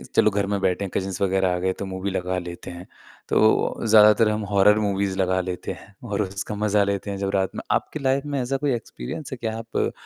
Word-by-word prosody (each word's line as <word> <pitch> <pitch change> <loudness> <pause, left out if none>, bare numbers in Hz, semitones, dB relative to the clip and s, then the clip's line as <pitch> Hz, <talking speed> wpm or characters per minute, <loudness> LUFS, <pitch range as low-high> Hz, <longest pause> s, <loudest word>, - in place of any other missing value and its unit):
चलो 105 - +5
घर 100 0 0
में 100 0 -1
बैठे 95 +2 0
हैं - - -5
कज़िन्स 95 -1 -3
वगैरह 95 -1 +2
आ - - -1
गए 95 +1 +1
तो 100 - -3
मूवी 95 +1 -4
लगा 90 0 -2
लेते 85 -1 -8
हैं। 85 +1 -9 0.4
तो - - +2 0.5
ज़्यादातर 105 0 +6
हम 105 0 -1
हॉरर 105 +1 +5
मूवीज़ 100 -2 -1
लगा 95 0 +2
लेते 90 0 -4
हैं, 100 - -15
और 105 -3 -2
उसका 100 +2 -5
मजा 105 0 +2
लेते 100 0 -2
हैं। 100 - -4
जो 100 0 -1
रात 95 -1 0
में - - -4 0.2
आपकी 155 - -7
लाइफ़ 135 +1 0
में 140 -2 -1
ऐसा 130 +2 -1
कोई 140 -1 0
एक्सपीरियंस 115 - -7
है? 130 - -5
कि 115 - -4
आप 115 +1 -2
100 Hz, 235 wpm, -24 LUFS, 95-110 Hz, 0.5 s, ज़्यादातर